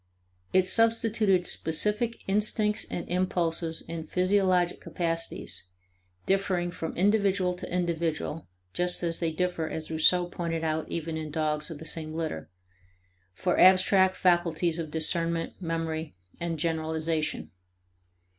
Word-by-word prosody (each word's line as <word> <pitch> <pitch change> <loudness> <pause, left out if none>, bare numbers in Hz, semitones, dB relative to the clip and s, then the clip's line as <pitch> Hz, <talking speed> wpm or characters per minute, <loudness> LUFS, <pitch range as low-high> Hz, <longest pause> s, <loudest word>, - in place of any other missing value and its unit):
It 185 -1 +4
substituted 220 -3 +3
specific 210 +10 0
instincts 210 +1 +1
and 175 - -4
impulses 170 -2 -1
and 165 -1 -6
physiological 185 -1 +2
capacities, 165 - -2 0.6
differing 185 -2 +1
from 165 -2 -5
individual 195 -1 +2
to - - -8
individual 165 -3 -2 0.3
(just 180 0 -1
as 165 -1 -1
they 165 -2 0
differ, 175 -1 -1
as 160 0 -6
Rousseau 175 +3 +4
pointed 170 -2 -3
out, 160 0 -1
even 165 -1 -3
in 155 -1 -5
dogs 150 0 -1
of 165 - -6
the 160 - -10
same 155 0 -4
litter), 155 - -4 0.9
for 175 - 0
abstract 190 0 +6
faculties 175 -2 +2
of 160 -2 -4
discernment, 165 +2 -1
memory, 165 - -3 0.2
and 170 -1 -2
generalization. 160 0 -2
170 Hz, 120 wpm, -28 LUFS, 160-185 Hz, 0.9 s, abstract